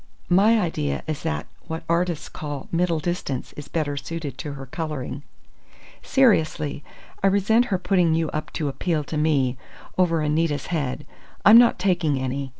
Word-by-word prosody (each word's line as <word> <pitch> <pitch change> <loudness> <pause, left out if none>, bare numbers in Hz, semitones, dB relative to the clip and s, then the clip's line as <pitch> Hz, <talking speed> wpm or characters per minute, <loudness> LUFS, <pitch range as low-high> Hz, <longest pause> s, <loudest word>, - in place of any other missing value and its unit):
My 210 +5 +5
idea 75 - -1
is 155 -2 -3
that 75 -1 -2 0.2
what 160 +1 -5
artists 170 -1 0
call 145 -3 -6
middle 170 -1 +1
distance 155 -6 -3
is 145 - -9
better 150 -3 -2
suited 145 -1 -5
to 145 +1 -5
her 135 -1 -8
colouring. 150 -1 -5 0.8
Seriously, 160 - +2 0.4
I 195 - +4
resent 205 +5 +3
her 200 -6 0
putting 180 -3 +2
you 160 -1 0
up 155 +1 -4
to 155 - -2
appeal 155 +2 -1
to 150 - -6
me 135 -5 +1 0.4
over 165 -3 +3
Anita's 150 -2 0
head. 140 -6 -2 0.4
I'm 220 +3 +10
not 240 -1 +5
taking 175 -7 +1
any! 130 +1 -3
160 Hz, 155 wpm, -24 LUFS, 145-180 Hz, 0.8 s, I'm